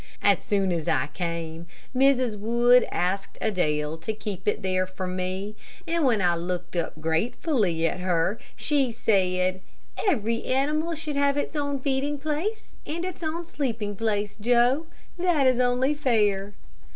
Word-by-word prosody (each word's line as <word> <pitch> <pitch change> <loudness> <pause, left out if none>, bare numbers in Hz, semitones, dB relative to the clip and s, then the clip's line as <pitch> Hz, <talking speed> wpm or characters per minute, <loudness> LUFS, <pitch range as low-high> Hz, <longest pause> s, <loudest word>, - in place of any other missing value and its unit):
As 200 -2 +4
soon 195 -2 +1
as 165 -2 -2
I 165 - +1
came, 170 -1 -4 0.3
Mrs. 255 -3 +3
Wood 235 +4 +4
asked 195 +2 -1
Adele 155 -7 0
to 165 +7 -4
keep 205 -3 -6
it 210 - +1
there 185 0 +1
for 185 0 -5
me 185 +3 -3 0.3
and 335 0 +1
when 230 -7 +3
I 175 -1 +4
looked 175 +1 -4
up 170 -2 -2
gratefully 170 - 0
at 165 - 0
her, 180 +3 +1 0.2
she 280 -4 +1
said: 185 -4 +1 0.5
"Every 230 - +1
animal 305 +5 +1
should 305 -2 -4
have 280 0 +2
its 290 - -2
own 285 -2 -1
feeding 280 +2 0
place 310 +10 -3
and 335 +3 -3
its 370 -1 -6
own 335 +1 -3
sleeping 225 -10 -3
place, 205 -1 -1
Joe; 245 +7 +3 0.3
that 345 -6 +3
is 255 -1 +4
only 250 +3 +2
fair." 210 -8 +1
220 Hz, 150 wpm, -26 LUFS, 185-280 Hz, 0.5 s, As